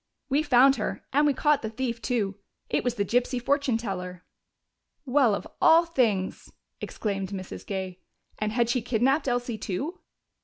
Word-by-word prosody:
"We 280 +3 +2
found 270 -2 +5
her, - - -3
and 295 +2 +4
we 290 - +3
caught 295 +1 +2
the 220 - -3
thief 235 0 -3
too. 205 -6 -1 0.3
It - - +1
was 245 -1 -1
the 200 - 0
gypsy 245 +4 0
fortune 275 -1 +1
teller." 180 -5 -6 0.8
"Well, 255 -5 +3
of - - -6
all 330 +1 +6
things!" 225 - -1 0.3
exclaimed 195 -3 -3
Mrs. 190 -2 -7
Gay. 190 -2 -4 0.4
"And 215 0 -1
had 235 +1 +1
she 240 +1 0
kidnaped 255 +5 +1
Elsie 245 -3 -1
too?" 285 - -4
240 Hz, 160 wpm, -26 LUFS, 200-270 Hz, 0.8 s, all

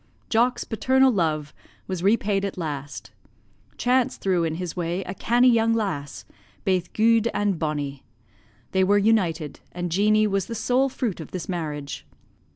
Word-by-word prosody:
"Jock's 240 +2 +2
paternal 260 +5 +3
love 155 -7 -1 0.3
was 185 -3 -4
repaid 200 0 +2
at 200 -1 -3
last; 145 -4 -5 0.7
chance 250 0 +1
threw 185 -3 +1
in 160 -1 -1
his 180 -1 -5
way 175 +1 -2
a 185 - -6
cannie 240 +5 +3
young 230 -1 +3
lass, 160 -11 -3 0.4
baith 185 -3 0
guid 230 +1 +3
and 205 -4 0
bonnie: 145 -3 -3 0.7
they 190 0 +3
were 200 +2 +4
united, 180 -8 +1
and 175 -1 -4
Jeanie 215 +4 +3
was 195 -2 0
the 230 - -5
sole 250 +5 +1
fruit 245 -8 -3
of 160 - -8
this 180 -4 -5
marriage. 150 -6 -4
195 Hz, 155 wpm, -24 LUFS, 165-225 Hz, 0.7 s, were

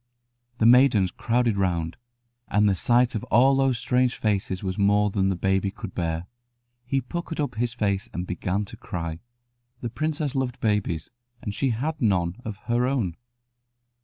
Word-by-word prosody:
The 110 - +2
maidens 120 -6 +6
crowded 115 0 +1
round, 85 -4 0 0.5
and 105 0 +3
the 100 - +4
sight 120 +6 +3
of 110 - -3
all 130 +4 +5
those 135 -2 +2
strange 125 +1 +1
faces 100 -3 -1
was 95 -1 -2
more 105 +1 +3
than 95 -1 +1
the 95 - 0
baby 95 +2 +1
could 105 -1 -8
bear. 85 -1 -2 0.6
He 135 +2 0
puckered 165 +5 -5
up 145 - -1
his 120 +1 -2
face 100 -4 -1
and 90 - -4
began 95 +3 -2
to - - -11
cry. 85 -2 -5 0.6
The 120 - -4
princess 155 +1 -2
loved 130 -3 -2
babies, 105 -7 -1 0.3
and 105 - -3
she 135 +5 0
had 145 +7 -2
none 90 -5 +1
of 110 -2 -5
her 120 +1 +1
own. 115 -11 -1
110 Hz, 165 wpm, -25 LUFS, 95-125 Hz, 0.6 s, maidens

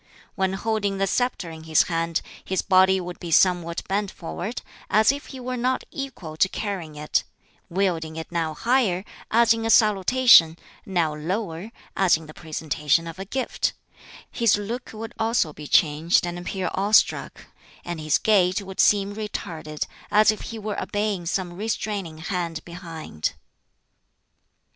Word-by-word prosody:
When 190 -1 0
holding 205 -1 -1
the 195 - +1
sceptre 195 -5 -1
in 160 0 -10
his 160 -1 +4
hand, 165 0 -1 0.2
his 190 -1 -1
body 190 0 +5
would 180 -1 -7
be 175 - -6
somewhat 170 0 +2
bent 200 +1 0
forward, 185 +7 -6 0.3
as 215 +4 +5
if 285 +1 -7
he 265 - -9
were 255 0 -4
not 255 +2 0
equal 230 - -6
to 190 - +4
carrying 185 -9 -4
it; 150 0 0 0.5
wielding 170 -4 -1
it 160 +1 -7
now 165 -2 -1
higher, 225 -6 +1 0.2
as 230 0 +5
in 225 0 -4
a 225 - -1
salutation, 210 -5 +6 0.3
now 170 -5 +1
lower, 180 +4 -4 0.2
as 185 -4 +4
in 160 - -12
the 155 - -11
presentation 155 0 -1
of 165 +2 -8
a 195 - -5
gift; 260 +6 -1 0.6
his 230 -3 +3
look 230 +5 -5
would 225 0 -7
also 225 -8 +1
be 150 0 -9
changed 160 +5 +3
and 175 0 -4
appear 180 0 -3
awestruck; 205 +3 +2 0.4
and 175 -2 -4
his 155 -1 +2
gait 190 -3 +3
would 190 -1 -9
seem 200 -1 +4
retarded, 170 -7 -5 0.2
as 215 +1 +5
if 215 - -6
he 225 - -6
were 210 -1 -4
obeying 205 -4 -2
some 180 0 -2
restraining 200 -4 -3
hand 170 0 -4
behind. 165 - -5
190 Hz, 155 wpm, -24 LUFS, 165-215 Hz, 0.6 s, salutation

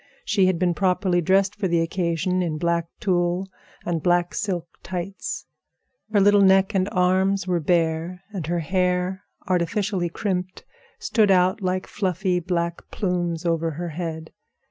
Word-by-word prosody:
She 195 - +3
had 185 -2 +1
been 175 0 +1
properly 180 -1 +1
dressed 195 +3 +3
for 190 - -1
the 170 -1 +2
occasion 170 +1 0
in 165 -3 -1
black 170 0 0
tulle 180 -2 0 0.4
and 170 -2 -1
black 175 +1 +2
silk 185 -6 -2
tights. 185 +1 -5 0.7
Her 210 - +4
little 205 +1 +5
neck 190 +1 +5
and 190 0 +1
arms 190 +1 +2
were 180 -2 0
bare, 165 +2 0
and 175 -7 -4
her 170 0 0
hair, 180 +2 0 0.3
artificially 185 +1 0
crimped, 185 0 -3 0.3
stood 215 -3 +2
out 185 +1 +3
like 185 0 -1
fluffy 185 -2 -1
black 170 -1 -3
plumes 175 -3 -2
over 165 -1 +1
her 170 +3 -5
head. 160 -1 -5
180 Hz, 145 wpm, -24 LUFS, 170-190 Hz, 0.7 s, little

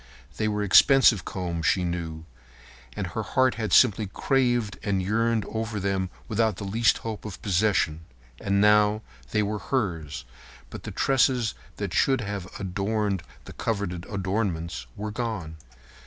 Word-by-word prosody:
They 110 - 0
were 105 -1 -1
expensive 115 +1 +6
combs, 85 -3 -3
she 95 -2 +2
knew, 85 -2 -4 0.7
and - - -2
her - - -4
heart 130 -1 +2
had 110 -4 -3
simply 110 -2 +5
craved 120 0 0
and 100 -2 0
yearned 110 +3 +1
over 110 -1 -3
them 95 -1 -1 0.2
without 110 -1 +1
the - - -6
least 110 +3 +2
hope 110 -3 -4
of 105 -4 -7
possession. 95 -5 +1 0.4
And 100 0 +1
now, 105 +1 +4 0.3
they 105 - +1
were 105 +1 -2
hers, 85 - -2 0.5
but - - -7
the - - -4
tresses 125 -4 +2 0.2
that 100 -3 -4
should 135 -2 +3
have 100 -3 -4
adorned 100 +1 -1 0.2
the - - -10
coveted 100 -6 -3
adornments 95 - -2
were 105 +1 -4
gone. 105 -9 -4
105 Hz, 145 wpm, -26 LUFS, 95-110 Hz, 0.7 s, expensive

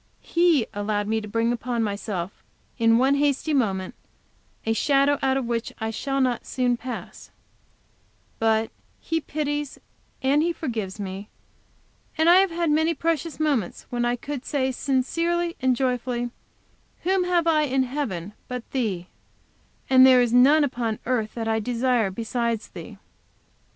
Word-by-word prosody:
He 335 -8 +3
allowed 205 0 -1
me 220 +1 0
to 210 - -8
bring 230 +2 0
upon 240 -1 -2
myself, 200 -3 -3 0.5
in 230 0 +5
one 265 +3 +3
hasty 285 +2 +1
moment, 195 -9 0 0.7
a 225 - +2
shadow 280 +3 +2
out 265 0 +2
of 265 - -2
which 235 0 -2
I 220 -1 -2
shall 275 +4 -2
not 255 -3 +1
soon 250 -1 0
pass, 245 +1 -8 1.1
but 225 0 +2 0.3
He 325 0 -2
pities 295 -1 -3 0.4
and 280 +3 +3
He 340 +2 +1
forgives 225 - -4
me, 195 +1 -6 0.9
and 320 +1 +3
I 350 +2 +8
have 385 0 +4
had 335 -2 0
many 320 +2 +2
precious 330 0 -2
moments 280 - -1
when 240 -1 -1
I 240 0 +1
could 275 +1 -6
say 265 -2 0
sincerely 335 +7 0
and 260 -1 +3
joyfully, 245 -1 -1 0.7
"Whom 370 0 +2
have 350 -2 +2
I 310 -2 +3
in 265 -1 +1
heaven 225 - -4
but 250 -2 -6
Thee, 210 -9 -1 0.8
and 260 -1 +7
there 260 -1 +8
is 240 -1 -1
none 280 +5 +6
upon 240 -5 -1
earth 230 -4 -1
that 225 -1 -3
I 220 0 +1
desire 240 -1 +1
besides 230 +2 -2
Thee." - - -10
255 Hz, 150 wpm, -24 LUFS, 225-290 Hz, 1.1 s, I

